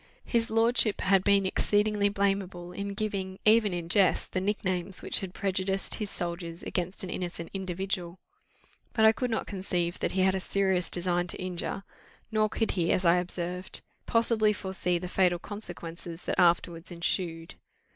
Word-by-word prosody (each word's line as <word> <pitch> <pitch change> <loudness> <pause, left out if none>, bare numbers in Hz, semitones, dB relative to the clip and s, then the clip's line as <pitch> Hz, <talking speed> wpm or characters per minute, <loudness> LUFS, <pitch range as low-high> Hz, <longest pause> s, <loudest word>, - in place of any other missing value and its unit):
His 230 -2 +1
lordship 225 -1 +3
had 195 -1 +3
been 200 -1 +4
exceedingly 205 +1 +2
blamable 195 -3 -1
in 200 0 -4
giving, 195 -3 -3
even 215 -1 +5
in 175 -2 -4
jest, 190 +2 +2
the 185 - 0
nicknames 190 -2 -2
which - - 0
had 190 -2 -5
prejudiced 195 0 -1
his 210 -2 -2
soldiers 170 -2 -5
against 180 +2 -1
an 185 - -4
innocent 175 -2 -5
individual; 190 -1 -3 0.8
but 220 -2 +4
I 220 - +9
could 250 +2 -2
not 225 - -1
conceive 180 -3 -2
that - - -1
he 190 - +1
had 190 0 +4
a 190 - -1
serious 190 -2 0
design 175 0 +1
to - - -4
injure; 185 +1 -4 0.5
nor 215 -1 +2
could 225 +1 0
he, 170 -3 +1
as 185 - +1
I 170 +1 +6
observed, 180 +1 -1 0.3
possibly 225 -2 +3
foresee 190 -3 -1
the 180 +1 -5
fatal 180 -1 +2
consequences 170 -4 -5
that - - -2
afterwards 170 -1 +2
ensued. 170 -1 -3
190 Hz, 165 wpm, -29 LUFS, 175-200 Hz, 0.8 s, I